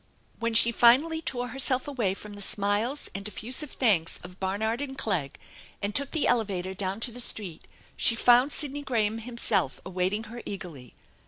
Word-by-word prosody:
When 230 -1 -1
she 230 +1 +7
finally 275 +8 +4
tore 245 -5 -3
herself 265 0 +1
away 230 -10 -1
from 210 +1 -10
the 205 - -8
smiles 205 +8 0
and 195 +1 -5
effusive 250 +8 -2
thanks 195 -10 +1
of 180 +1 -12
Barnard 220 +6 -1
and 270 -2 -5
Clegg 170 -11 -1 0.4
and 200 0 -3
took 280 +2 -1
the 315 - 0
elevator 190 -5 0
down 190 +1 -3
to 240 - -2
the 245 - -8
street 200 -8 -1 0.3
she 235 - +3
found 245 +4 +5
Sidney 290 -1 -1
Graham 225 -5 0
himself 220 - -1
awaiting 185 +3 -1
her 235 +2 -9
eagerly. 165 - -8
220 Hz, 170 wpm, -27 LUFS, 195-250 Hz, 0.4 s, she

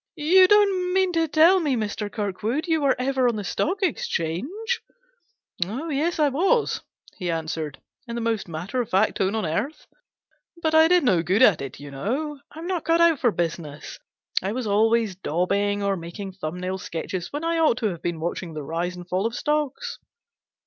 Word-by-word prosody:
" - - -65 0.2
You 375 -1 +9
don't 385 -3 +3
mean 375 -1 +2
to 330 -1 +2
tell 325 +5 +5
me, 295 -6 +1
Mr. 210 -2 -3
Kirkwood, 215 +6 -2
you 320 -2 +2
were 275 -2 +3
ever 260 0 +1
on 235 - +1
the 210 - -4
Stock 370 - -1
Exchange? 380 - -2 0.2
" - - -42
" 175 - -5
Oh 255 - -5
yes, 310 +4 0
I 305 -2 +4
was," 390 - +1 0.4
he 180 -3 -3
answered, 160 -3 -3 0.3
in 235 - -5
the - - -2
most 225 -3 -1
matter 175 +9 -3
of 235 - -5
fact 195 +3 +2
tone 195 +2 +1
on 220 -4 -1
earth. 210 - -3 0.4
" 340 - -27
But 315 0 +1
I 320 0 +7
did 360 0 +4
no 185 -10 +3
good 185 +5 +3
at 180 -9 +5
it, 135 -2 -7
you 145 0 -9
know; 275 - -3
I'm 320 +2 -8
not 360 -3 -2
cut 330 +1 +2
out 335 -4 +5
for 240 - +3
business. 165 -5 -4 0.4
I 195 +3 -2
was 250 0 -3
always 220 0 +2
daubing 200 +4 0
or 200 0 +1
making 180 +3 -7
thumb 180 -2 -6
nail 185 +1 -3
sketches 175 +1 -5
when 290 +2 -4
I 330 0 0
ought 310 -7 +3
to 220 -4 0
have 170 -4 -6
been 170 -2 -3
watching 170 0 -4
the 150 - -4
rise 170 +4 -3
and 175 0 -10
fall 185 +4 0
of 230 - -6
stocks. 295 -1 -2
225 Hz, 205 wpm, -24 LUFS, -, 0.4 s, You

